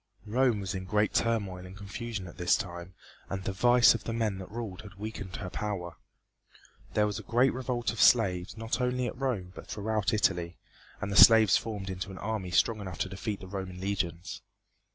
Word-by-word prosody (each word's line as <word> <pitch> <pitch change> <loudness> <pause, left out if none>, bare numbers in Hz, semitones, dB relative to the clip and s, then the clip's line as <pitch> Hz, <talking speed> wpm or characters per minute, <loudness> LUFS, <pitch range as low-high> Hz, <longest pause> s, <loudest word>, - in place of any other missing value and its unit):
Rome 115 -1 +2
was 95 0 -3
in 95 -1 -4
great 105 +2 +1
turmoil 100 -6 0
and 95 +1 -11
confusion 105 0 -5
at 85 - -11
this 90 - +4
time, 90 -2 -7 0.3
and 95 -1 -4
the 95 - -2
vice 120 +4 +6
of 115 - -5
the 115 - -2
men 110 -4 -1
that 95 - -8
ruled 110 -4 -6
had 100 -3 -12
weakened 100 -2 -6
her 90 -3 -6
power. 90 -6 -4 1.0
There 105 - +4
was 105 +1 -2
a - - -6
great 120 +6 +2
revolt 125 -3 -2
of 115 - -3
slaves 95 -5 +4
not 115 +3 -2
only 125 0 0
at 120 - -4
Rome 120 -9 -2
but - - -11
throughout 105 -2 -1
Italy, 90 -5 0 0.4
and 105 -2 -3
the - - -2
slaves 110 -3 +7
formed 100 -4 -3
into 95 +1 -5
an 95 - -8
army 105 -3 -3
strong 110 +4 +2
enough 95 -5 -6
to 95 - -2
defeat 100 +1 -4
the 95 - -8
Roman 95 -1 -6
legions. 95 -2 -3
100 Hz, 200 wpm, -29 LUFS, 95-115 Hz, 1.0 s, slaves